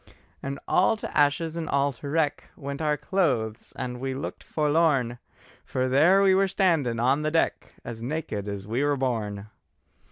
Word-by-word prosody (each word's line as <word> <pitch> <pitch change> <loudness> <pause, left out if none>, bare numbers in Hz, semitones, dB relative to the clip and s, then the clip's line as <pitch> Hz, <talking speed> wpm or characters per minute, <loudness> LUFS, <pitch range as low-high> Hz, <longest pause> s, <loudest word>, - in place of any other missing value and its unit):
And 140 +1 -4
all 190 +4 +3
to - - -7
ashes 150 +3 +2
and 165 -2 -4
all 140 0 +2
to 140 +3 -8
wreck 150 -1 0
Went 140 +2 -6
our 150 -1 +1
clothes, 125 - -1
and 125 -1 -5
we 130 0 -3
looked 135 - -6
forlorn, 150 -6 +1 0.4
For 130 0 -1
there 165 +10 +5
we 190 -1 +5
were 195 +1 +3
standing 165 - +1
on 130 +5 +2
the 155 - 0
deck 165 +1 0
As 115 -2 -6
naked 120 -6 -3
as 100 -1 -5
we 115 +6 -1
were 145 -1 +1
born! 105 -6 -2
140 Hz, 170 wpm, -26 LUFS, 120-160 Hz, 0.4 s, there